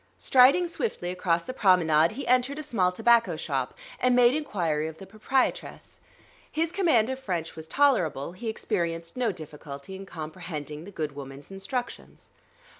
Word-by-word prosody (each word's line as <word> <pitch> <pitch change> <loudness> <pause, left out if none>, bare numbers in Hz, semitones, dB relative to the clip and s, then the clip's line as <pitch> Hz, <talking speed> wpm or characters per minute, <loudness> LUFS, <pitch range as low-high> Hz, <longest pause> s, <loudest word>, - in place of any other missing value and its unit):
Striding 270 +8 +5
swiftly 335 - -3
across 175 -2 0
the 255 - -6
promenade, 170 -7 +4
he 275 - -6
entered 255 +3 +2
a 305 - -4
small 195 -11 +1
tobacco 225 -3 +3
shop 135 -5 -3 0.2
and 250 -1 +3
made 245 0 +6
inquiry 170 - -1
of 160 0 -8
the 195 - -10
proprietress. 215 +6 -2 0.5
His 325 +1 0
command 310 - +3
of 260 - -4
French 175 -10 -3
was 160 0 -9
tolerable; 175 - +2
he 220 +6 -5
experienced 170 -6 -2
no 245 -3 +1
difficulty 150 0 -9
in 195 +1 -9
comprehending 155 -2 -7
the 200 - -10
good 155 -5 -3
woman's 140 +3 -9
instructions. 240 +6 -6
190 Hz, 155 wpm, -27 LUFS, 160-250 Hz, 0.5 s, made